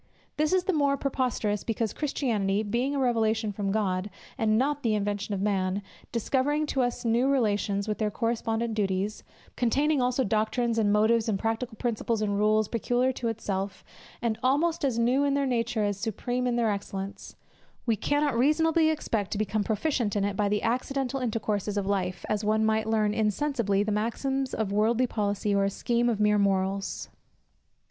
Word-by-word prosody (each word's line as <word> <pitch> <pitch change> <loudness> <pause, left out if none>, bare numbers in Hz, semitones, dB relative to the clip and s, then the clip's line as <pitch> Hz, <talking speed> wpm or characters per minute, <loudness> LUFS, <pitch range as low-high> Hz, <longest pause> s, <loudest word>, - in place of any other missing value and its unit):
This 305 0 +1
is 370 -1 +3
the 380 +1 0
more 285 -2 +2
preposterous, 250 -7 -1
because 225 -1 -2
Christianity, 215 -9 0
being 240 +7 -1
a - - 0
revelation 225 -3 +1
from 200 -1 -2
God, 195 -2 0 0.3
and 215 -1 +2
not 290 +3 +1
the 225 -5 +1
invention 205 0 -2
of 195 - -2
man, 195 -1 0 0.3
discovering 275 +6 0
to 265 - +2
us 245 -1 -2
new 235 +3 +3
relations, 205 -5 +1
with 210 - -2
their 215 -1 +1
correspondent 230 0 -1
duties; 200 0 -1 0.3
containing 280 +4 +2
also 250 +1 +1
doctrines, 225 +2 0
and 205 -2 +2
motives, 220 +2 +3
and 205 - +1
practical 225 +3 -2
principles, 230 -2 -1
and 205 -1 0
rules, 215 0 +3
peculiar 245 +3 +1
to 245 -2 -4
itself, 200 -3 -3 0.4
and 225 -2 0
almost 315 +6 +1
as 260 -5 +1
new 245 +4 +3
in 280 -1 +2
their 280 0 +1
nature 235 -3 0
as 205 -1 -1
supreme 245 +4 -2
in 245 - +1
their 230 -2 +2
excellence, 200 -1 -6 0.5
we 230 -3 +2
cannot 290 +4 0
reasonably 315 +5 +3
expect 225 -10 -1
to - - -3
become 215 0 0
proficients 225 0 0
in 205 - +1
it 200 -1 -2
by 205 -1 +1
the 210 0 0
accidental 265 +3 -1
intercourses 215 -4 -2
of 200 - 0
life, 185 -2 -1
as 210 0 -1
one 215 +1 +2
might 220 0 +1
learn 215 -2 +2
insensibly 215 -1 +1
the 210 - -2
maxims 260 +5 -1
of 215 -3 -2
worldly 225 +4 +2
policy, 205 -3 -1
or 200 0 +3
a - - +1
scheme 240 +4 0
of 220 -3 -1
mere 210 0 +3
morals. 195 0 0
220 Hz, 180 wpm, -27 LUFS, 205-250 Hz, 0.5 s, is